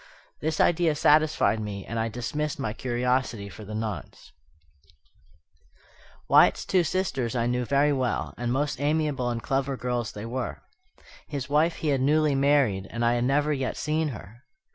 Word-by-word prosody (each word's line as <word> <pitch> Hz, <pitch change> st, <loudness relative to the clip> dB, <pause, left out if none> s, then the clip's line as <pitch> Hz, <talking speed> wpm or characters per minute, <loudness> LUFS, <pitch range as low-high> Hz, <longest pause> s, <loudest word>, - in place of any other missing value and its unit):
This 155 Hz, +1 st, -2 dB
idea 170 Hz, -2 st, +3 dB
satisfied 150 Hz, -8 st, +3 dB
me 100 Hz, -2 st, -5 dB
and 115 Hz, -, -4 dB
I 115 Hz, 0 st, 0 dB
dismissed 145 Hz, +6 st, -3 dB
my 115 Hz, -7 st, -3 dB
curiosity 120 Hz, -3 st, -1 dB
for 105 Hz, -, -11 dB
the 105 Hz, +1 st, -7 dB
nonce. 110 Hz, -2 st, -6 dB, 2.0 s
Wyatt's -, -, +5 dB
two 185 Hz, -2 st, +2 dB
sisters 135 Hz, -, -1 dB
I 120 Hz, -1 st, +1 dB
knew 125 Hz, +1 st, 0 dB
very 140 Hz, +3 st, +3 dB
well, 130 Hz, -3 st, -1 dB
and 120 Hz, 0 st, -3 dB
most 145 Hz, +2 st, -1 dB
amiable 145 Hz, -4 st, 0 dB
and 115 Hz, -1 st, -3 dB
clever 135 Hz, -1 st, -1 dB
girls 125 Hz, -3 st, -2 dB
they 105 Hz, +1 st, -7 dB
were. 125 Hz, +2 st, -4 dB, 0.6 s
His 140 Hz, -3 st, -5 dB
wife 155 Hz, +3 st, +3 dB
he 155 Hz, -, -2 dB
had 135 Hz, -2 st, +1 dB
newly 150 Hz, +2 st, +3 dB
married, 135 Hz, -9 st, +2 dB
and 115 Hz, 0 st, -2 dB
I 120 Hz, -, +3 dB
had 120 Hz, 0 st, 0 dB
never 145 Hz, +3 st, +2 dB
yet 135 Hz, -2 st, -2 dB
seen 155 Hz, +1 st, 0 dB
her. 115 Hz, -, -9 dB
130 Hz, 165 wpm, -26 LUFS, 115-150 Hz, 2.0 s, Wyatt's